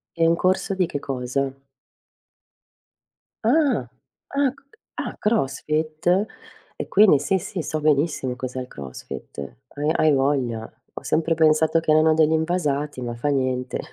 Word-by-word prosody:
E 165 -1 +3
un 165 - +4
corso 185 +2 +1
di 185 -2 +1
che 145 - -4
cosa? 135 0 -2 1.9
Ah, 250 - +2 0.5
ah, 280 -1 +3
c - - -21 0.4
ah, - - -4
crossfit? 160 - 0 0.5
E - - -5
quindi 195 -8 +6
sì, 190 +6 +1
sì, 185 0 -5
so 155 +2 -2
benissimo 145 -3 +1
cos'è 130 +1 -5
il 125 - -5
crossfit, 70 - -9 0.4
uhm, 150 +2 +1
hai 155 - +4
voglia, 135 -5 0 0.2
ho - - -8
sempre 165 +1 +1
pensato 160 0 +3
che 165 - -6
erano 155 +1 +5
degli 155 0 +3
invasati, 150 -4 -1
ma 120 -1 -4
fa 120 +5 -2
niente. 130 -2 -1
155 Hz, 140 wpm, -23 LUFS, 135-170 Hz, 1.9 s, quindi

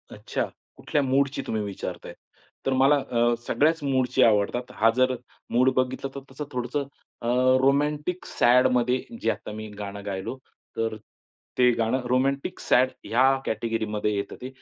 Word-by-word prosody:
अच्छा - - -3 0.3
कुठल्या 145 - 0
मूडची 135 +1 +1
तुम्ही 110 -1 -1
विचारताय? 100 -1 -6 0.5
तर 135 - +1
मला 135 +3 +5
अ, 120 -3 +1
सगळ्याच 160 +1 +2
मूडची 130 -1 +2
आवडतात. 115 +4 +2
हा 115 +1 +4
जर 130 0 +3 0.4
मूड 125 +2 +4
बघितला 130 +1 -1
तर - - -4
तसं 145 +2 -6
थोडंसं 125 +3 -2 0.3
अ, 115 - -4 0.3
रोमॅन्टिक 150 +5 +1
सॅडमध्ये 125 0 +3 0.2
जे - - +1
आता - - -7
मी 110 0 -6
गाणं 100 0 -6
गायलो 95 +6 -4 0.4
तर 115 -1 -1 0.6
ते 125 -1 +6
गाणं 115 +3 +1
रोमॅन्टिक 135 +2 0
सॅड 130 +1 +3
ह्या 125 +3 +2 0.2
कॅटेगरीमध्ये 110 -1 -1
येतं 100 - -4
ते. 130 - -5
125 Hz, 145 wpm, -25 LUFS, 115-135 Hz, 0.6 s, ते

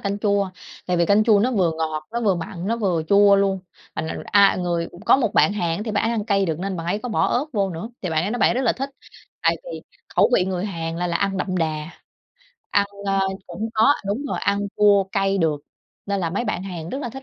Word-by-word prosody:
canh 200 0 -2
chua, 200 -2 +1 0.4
tại 180 -1 0
vì 170 -1 +2
canh 210 +1 +4
chua 220 -3 +5
nó 245 +5 +2
vừa 180 -7 +2
ngọt, 155 -1 -2
nó 235 - -1
vừa 200 -5 +2
mặn, 170 +1 -6
nó 230 +3 0
vừa 185 -8 0
chua 200 0 +6
luôn. 195 -1 +1 0.4
Mình 160 - -2
mình - - -5
a, 200 -1 +5
người 170 -2 -1 0.2
có - - +7
một 240 -6 -1
bạn - - +4
Hàn 175 -1 -1
thì 220 - -4
bạn 205 -1 0
ấy 225 - +1
ăn 220 -3 -1
cay 195 -2 +2
được, 160 -1 -2
nên 190 0 -3
bạn 165 -1 -5
ấy 200 +4 0
có 245 - -6
bỏ 220 - +1
ớt 255 +4 +1
vô 200 -4 0
nữa, 170 +7 -6
thì 180 - -2
bạn 160 +2 +1
ấy 200 - -2
nói 245 - -2
bạn - - +4
ấy - - 0
rất 255 - 0
là 240 - +3
thích. 270 +1 -5 0.5
Tại - - +3
vì - - -7 0.3
khẩu - - +5
vị 180 - +3
người 185 0 -2
Hàn 165 -4 -4
là 175 +1 -1
là 170 - 0
ăn 195 -1 -1
đậm 185 0 -2
đà, 155 -1 -2 0.8
ăn, 200 0 +3 0.2
ơ, 195 0 +1 0.3
cũng 195 +6 -4
có 220 +6 +5
đúng 210 +8 -1
rồi, - - -3
ăn 200 0 +1 0.2
chua 205 -1 +5
cay 195 0 +1
được, 155 -4 +1 0.5
nên 200 -1 -1
là 165 - -1
mấy 200 +7 -2
bạn 185 - -2
Hàn 175 -4 -6
rất 265 - -4
là 260 - -4
thích 270 +2 -9
195 Hz, 265 wpm, -22 LUFS, 175-210 Hz, 0.8 s, có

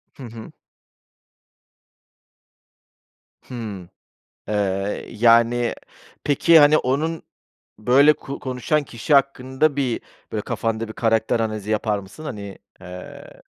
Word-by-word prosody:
Hı 135 - -11
hı. 115 -2 -10 2.9
Hımm. 105 -8 -8 0.6
Eee, 100 -1 -1
yani, 115 +1 +3 0.5
peki, 160 +3 +5
hani, 150 +1 +6
onun 155 +6 -1 0.6
böyle 135 +7 +5
ku 140 -2 -8
konuşan 130 +3 -1
kişi 120 +4 -1
hakkında 140 +1 +2
bir 130 -5 -1 0.3
böyle 105 - -2
kafanda 115 +1 -2
bir - - -7
karakter 115 0 +1
analizi 110 -2 -3
yapar 105 -1 0
mısın? 100 +11 -11
Hani, 100 -7 -7 0.2
eee 90 0 -11
115 Hz, 100 wpm, -22 LUFS, 105-140 Hz, 2.9 s, hani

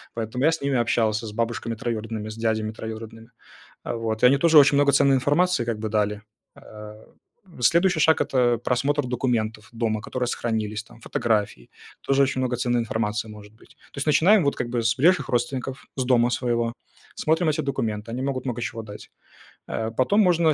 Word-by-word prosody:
поэтому 115 +3 -3
я 165 - +5
с 165 - -3
ними 140 -1 0
общался 115 -2 0
с 105 - -6
бабушками 115 0 -2
троюродными, 110 -2 -4
с 110 - -8
дядями 110 -1 -1
троюродными. 110 +1 -9 0.6
Э, - - -3
вот, 110 -1 -3
и 125 - +8
они 135 - +5
тоже 160 +1 +6
очень 145 0 +6
много 140 0 +4
ценной 140 0 +4
информации 145 +1 +1
как 115 -2 -3
бы 110 - -3
дали. 105 -1 -1 0.3
А, 105 0 -12 0.6
следующий 170 +6 +3
шаг- 160 0 +4
это 120 -3 +1
просмотр 140 +5 0
документов 110 -4 -2
дома, 115 -2 -1
которые 125 +1 -3
сохранились, 110 -2 -3
там, 115 +1 -18
фотографий. 105 - -2 0.3
Тоже 140 0 +2
очень 135 -1 0
много 125 -1 -1
ценной 120 -1 0
информации 110 -1 -2
может 105 0 -12
быть. 135 +5 -22 0.2
То - - -10
есть, 140 - -2
начинаем, 175 +6 +4
вот, 140 - 0
как 120 - -3
бы 120 -1 -1
с 115 0 +1
ближайших 175 +7 +3
родственников, 125 +2 -2
с 130 - -1
дома 120 -1 +3
своего, 120 -2 -1 0.4
смотрим 160 +1 +1
эти 155 - -1
документы, 110 -5 -3
они 125 - -4
могут 135 -2 -3
много 120 -2 -3
чего 115 -2 -4
дать. 105 -1 -11 0.6
А 110 0 -3
потом 130 - +2
можно, 170 -4 +3
120 Hz, 185 wpm, -24 LUFS, 110-140 Hz, 0.6 s, и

